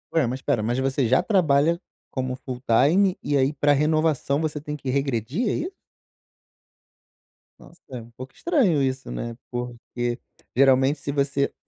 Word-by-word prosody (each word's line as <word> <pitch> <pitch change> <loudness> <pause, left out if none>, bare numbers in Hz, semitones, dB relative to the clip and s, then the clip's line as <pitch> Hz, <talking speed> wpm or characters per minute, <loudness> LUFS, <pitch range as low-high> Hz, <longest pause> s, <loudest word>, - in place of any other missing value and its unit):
Ué, 155 -7 +3
mas 130 +2 -3
espera, 115 - 0
mas 120 +4 -1
você 130 -1 +1
já 130 +9 +3
trabalha 170 -4 +2 0.3
como 130 -1 -2
full 125 -1 -7
time 175 - +4
e 145 - 0
aí 135 +1 +3
para 145 0 +2
renovação 150 -1 +1
você 155 -2 -2
tem 150 0 -5
que 135 - -10
regredir, 135 - -1
é - - 0
isso? 360 +4 -3 1.9
Nossa 170 - -17
é 125 -2 -5
um 115 +1 -15
pouco 130 +3 -10
estranho 240 - +2
isso, 130 0 -2
né, 115 -1 -5 0.2
porque 120 0 -4 0.4
geralmente 135 +2 +4
se 140 - -4
você 140 0 0
140 Hz, 160 wpm, -24 LUFS, 130-155 Hz, 1.9 s, time